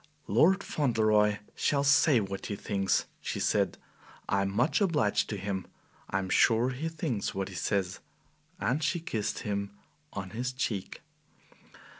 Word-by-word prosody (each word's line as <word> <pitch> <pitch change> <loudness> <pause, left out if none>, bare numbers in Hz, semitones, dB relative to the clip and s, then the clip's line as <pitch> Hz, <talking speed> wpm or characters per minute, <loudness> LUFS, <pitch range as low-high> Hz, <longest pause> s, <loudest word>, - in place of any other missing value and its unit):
"Lord 180 - +4
Fauntleroy 110 -6 +2 0.2
shall 140 -1 +1
say 140 -1 +5
what 100 -2 -4
he 100 - -3
thinks," 100 -1 0 0.2
she - - -3
said; - - +1 0.5
"and 100 - +1
I - - +2
am 100 - 0
much 120 - +2
obliged 150 - +2
to 105 - -3
him. 95 -1 -3 0.4
I 95 - 0
am 95 -1 -2
sure 115 +4 +4
he 150 +6 -3
thinks 150 - -3
what 95 0 -2
he 95 - -9
says." 95 -1 -1 0.6
And 125 +10 0
she 170 +4 +1
kissed 110 -9 -3
him 100 -1 -3 0.4
on 95 -2 -5
his 125 +4 -3
cheek. 110 -7 -3
110 Hz, 155 wpm, -30 LUFS, 100-135 Hz, 0.6 s, say